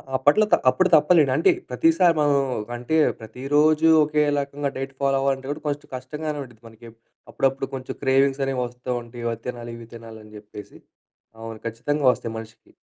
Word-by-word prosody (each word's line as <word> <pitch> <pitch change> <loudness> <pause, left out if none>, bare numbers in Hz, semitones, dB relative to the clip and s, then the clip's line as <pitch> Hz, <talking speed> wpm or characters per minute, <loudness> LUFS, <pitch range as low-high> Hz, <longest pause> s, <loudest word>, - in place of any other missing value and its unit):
అప్పట్లో 145 +11 +4
త - - +10
అప్పుడు 185 +7 +2
తప్పలే. 155 +2 +5
అంటే 160 - +4 0.2
ప్రతిసారి 325 - +3
మనం 145 -1 +3 0.4
అంటే 125 +6 -3 0.2
ప్రతిరోజూ 145 +8 +2
ఒకే 150 0 +1 0.2
రకంగా 140 0 -3
డైట్ 135 0 -5
ఫాలో 135 0 +2
అవ్వాలంటే 135 -1 -1
కూడా 150 +1 -6
కొంచెం 145 0 -3
కష్టంగానే 150 +4 -5
ఉంటది 120 -4 -16
మనకి. 115 +1 -14 0.4
అప్పుడప్పుడు 135 0 0
కొంచెం 130 -1 -7
క్రేవింగ్స్ 135 +1 +2
అనేవి 135 -2 -2
వస్తూ 125 +1 -10
ఉంటాయి. 120 0 -10
అవి 115 0 -6
తినాలి, 120 -1 -6
ఇవి 115 -1 -12
తినాలి 115 -1 -11
అని 105 0 -16
చెప్పేసి 105 -1 -12 0.6
అవును. 115 -1 -8
ఖచ్చితంగా 135 +6 -2
వస్తాయి 115 -2 -6
మనిషికి. 110 0 -12
135 Hz, 165 wpm, -23 LUFS, 115-145 Hz, 0.6 s, త